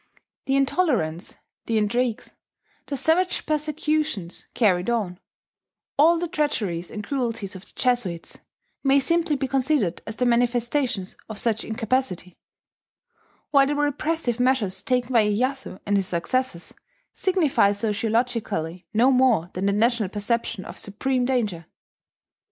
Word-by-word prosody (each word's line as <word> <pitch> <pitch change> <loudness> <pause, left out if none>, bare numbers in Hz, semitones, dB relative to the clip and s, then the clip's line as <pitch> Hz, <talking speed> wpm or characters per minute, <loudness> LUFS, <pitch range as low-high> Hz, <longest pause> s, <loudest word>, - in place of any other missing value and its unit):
The 270 - +2
intolerance, 265 - 0 0.3
the 230 - +1
intrigues, 235 +3 0 0.5
the 280 - -3
savage 345 +6 +1
persecutions 305 - -1
carried 185 -4 +2
on, 200 -7 -1 0.8
all 325 +4 +5
the 345 +1 -2
treacheries 220 - -1
and 210 - -6
cruelties 230 -5 -3
of 185 - -10
the - - -17
Jesuits, 225 -10 -1 0.4
may 275 0 +4
simply 330 +2 +2
be 270 -1 -1
considered 265 - +1
as 220 - -5
the 250 - 0
manifestations 240 -2 +1
of 220 - -6
such 225 0 0
incapacity; 220 -5 -2 1.1
while 275 -1 +5
the 290 - 0
repressive 290 -3 -1
measures 235 -8 +1
taken 250 0 0
by 230 -2 +6
Iyeyasu 255 0 -1
and 205 0 +2
his 195 -2 0
successors 180 +2 -2 0.4
signify 325 - +2
sociologically 215 -5 -1
no 245 +5 +5
more 250 -10 +3
than 190 +2 -1
the - - +3
national 220 0 +2
perception 210 -1 -2
of - - -6
supreme 250 +5 -1
danger. 215 -11 -1
240 Hz, 130 wpm, -24 LUFS, 200-270 Hz, 1.1 s, by